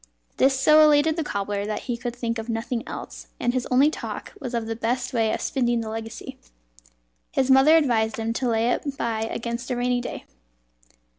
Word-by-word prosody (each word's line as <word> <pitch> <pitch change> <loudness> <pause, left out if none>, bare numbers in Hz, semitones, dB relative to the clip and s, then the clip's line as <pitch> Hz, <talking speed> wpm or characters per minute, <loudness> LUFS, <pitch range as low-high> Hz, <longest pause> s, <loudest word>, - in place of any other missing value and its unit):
This 265 0 +3
so 305 +3 +6
elated 305 +1 +4
the 325 - -1
cobbler 200 -5 -2
that 215 - -3
he 245 - -2
could 235 0 -5
think 230 -1 -3
of 225 +1 -7
nothing 230 +1 -2
else, - - -8
and 240 - 0
his 255 -1 -1
only 270 +4 +4
talk - - -6
was 250 -6 -5
of 230 -1 -1
the 225 0 -3
best 245 +3 -2
way 225 -2 +2
of - - -2
spending 240 -4 0
the 220 - -5
legacy. 225 +1 -7 0.9
His 265 0 +1
mother 270 +5 +7
advised 225 -7 +1
him 225 0 -2
to 250 +1 -1
lay 230 +1 +2
it 280 +1 -2
by 225 -1 -1
against 235 +1 -4
a 250 - 0
rainy 245 0 0
day. - - -7
240 Hz, 200 wpm, -24 LUFS, 225-265 Hz, 0.9 s, mother